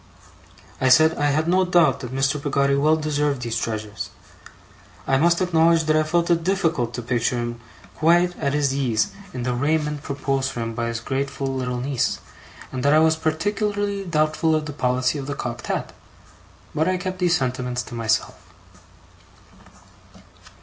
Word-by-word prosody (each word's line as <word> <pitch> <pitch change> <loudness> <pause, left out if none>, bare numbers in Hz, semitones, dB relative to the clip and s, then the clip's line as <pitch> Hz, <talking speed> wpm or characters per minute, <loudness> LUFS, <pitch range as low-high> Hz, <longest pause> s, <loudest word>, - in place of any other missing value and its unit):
I 130 - +3
said 155 +5 +6
I 145 - +2
had 155 +3 +1
no 185 +2 +3
doubt 175 -7 +3
that 125 -3 -7
Mr. 135 +2 0
Peggotty 140 -1 +1
well 150 +3 +3
deserved 150 -4 -1
these 115 -1 -3
treasures. 110 -3 -4 1.0
I 135 - +2
must 170 +5 +3
acknowledge 165 -1 +3
that 155 0 +1
I 155 - +4
felt 170 +2 +1
it 170 -1 +2
difficult 165 -10 0
to 120 - -5
picture 120 0 0
him 120 0 -4 0.4
quite 175 +2 +3
at 140 -2 0
his 140 -2 +1
ease 125 -6 0 0.2
in 125 - -5
the 125 0 -1
raiment 150 +3 0
proposed 135 -2 -2
for 120 - -5
him 115 0 -3
by 115 +1 -2
his 115 0 -3
grateful 135 +1 -3
little 125 -1 -2
niece, 135 0 -1 0.5
and 130 - -4
that 145 +3 +3
I - - +6
was 160 0 +4
particularly 200 +5 -1
doubtful 155 -2 +1
of 155 -1 -1
the 145 - -6
policy 125 +1 0
of 135 - -6
the 140 - -3
cocked 120 0 -5
hat; - - -3 0.8
but 155 +1 +1
I 185 0 +1
kept 185 0 -5
these 175 -2 +3
sentiments 125 -1 -2
to - - -11
myself. 115 -2 -1
145 Hz, 170 wpm, -23 LUFS, 125-160 Hz, 1.0 s, said